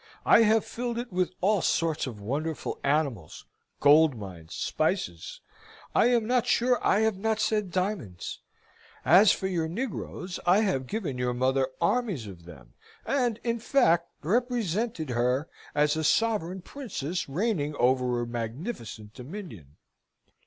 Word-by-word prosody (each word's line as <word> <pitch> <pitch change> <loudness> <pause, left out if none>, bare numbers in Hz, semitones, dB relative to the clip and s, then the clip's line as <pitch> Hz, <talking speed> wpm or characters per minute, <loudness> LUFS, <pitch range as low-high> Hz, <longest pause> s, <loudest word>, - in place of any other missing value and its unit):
I - - +7
have 220 0 +4
filled 240 0 -4
it 240 -4 -5
with 180 0 0
all 200 0 +3
sorts 160 -4 0
of 115 -5 -7
wonderful 145 +9 -3
animals, 140 - -1 0.3
gold 150 0 +6
mines, 90 -6 -9
spices; 85 -2 -2 0.5
I - - +4
am 240 -3 +2
not 245 +1 +1
sure 245 +1 +2
I 205 - +3
have 220 -3 +1
not 220 +1 0
said 215 -2 0
diamonds. 180 - -3 0.7
As 200 +1 +7
for 190 - -2
your 175 -4 0
negroes, 185 -2 -5
I 185 +4 +4
have 160 -12 0
given 170 - -3
your 125 0 0
mother 130 +1 +2
armies 205 - 0
of 90 -5 -11
them, 60 -8 -14 0.3
and, 245 -5 0
in 235 -1 -1
fact, 175 -9 +3 0.2
represented 220 - -1
her 125 +5 +1 0.3
as 150 +1 +3
a 160 - -2
sovereign 190 -1 +1
princess 185 - -5
reigning 155 -3 -1
over 125 -1 +2
a - - -3
magnificent 115 - -6
dominion. 125 - -10
170 Hz, 140 wpm, -27 LUFS, -, 0.7 s, I